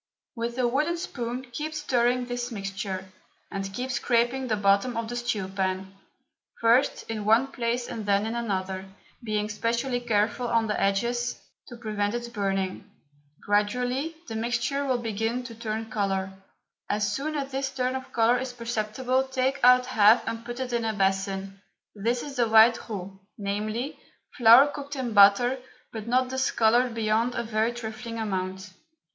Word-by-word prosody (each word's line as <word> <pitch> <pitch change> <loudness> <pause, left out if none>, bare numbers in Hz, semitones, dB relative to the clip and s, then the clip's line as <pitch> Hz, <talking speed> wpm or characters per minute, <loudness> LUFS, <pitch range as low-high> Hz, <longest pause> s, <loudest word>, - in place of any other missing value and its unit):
With 235 +1 -3
a 250 -1 +2
wooden 300 +8 0
spoon 250 -5 -4
keep 305 +5 -4
stirring 250 -4 +1
this 245 0 -4
mixture, 195 -2 -5 0.4
and 195 0 -4
keep 250 +6 -4
scraping 245 +2 +1
the 220 - +1
bottom 200 +4 +2
of 230 -1 -2
the 240 - -5
stew 240 -5 -2
pan, 190 0 -2 0.7
first 235 +4 +3
in 220 -2 -4
one 230 +6 +3
place 240 -1 -1
and 215 -2 -6
then 200 +1 +3
in 225 - -2
another, 190 -5 -2 0.4
being 210 -2 -1
specially 235 +4 -1
careful 225 +1 0
of 230 -1 +2
the 210 - -1
edges, 240 +5 0 0.3
to 240 - -10
prevent 210 -1 -2
its 240 0 -4
burning. 195 -3 -2 0.6
Gradually 250 +9 0
the 225 - -6
mixture 245 +5 -1
will 260 -2 +1
begin 225 +1 -2
to 240 -2 -8
turn 225 0 -4
colour. 195 -2 -1 0.6
As 205 0 0
soon 305 +6 -3
as 275 -2 -3
this 270 0 -1
turn 255 -1 -1
of 260 0 -6
colour 235 +2 +3
is 260 -1 -4
perceptible 240 +2 -1
take 265 +1 -1
out 250 0 +7
half 220 -2 +5
and 230 0 -3
put 240 +1 -6
it 255 -1 -3
in 235 -1 0
a 220 -1 0
basin. 195 0 -1 0.3
This 230 +4 -1
is 280 -2 -7
the 235 -2 +2
white 225 +2 +5
roux, 195 -2 -6 0.2
viz., 215 +6 -2 0.4
flour 235 +3 +8
cooked 285 0 -6
in 250 -4 -3
butter 210 +6 +6 0.3
but 220 -1 -6
not 255 +1 +2
discoloured 245 -2 +2
beyond 225 +2 +1
a 235 - -1
very 220 +1 0
trifling 230 0 -6
amount. 190 -2 -3
230 Hz, 165 wpm, -26 LUFS, 210-250 Hz, 0.7 s, flour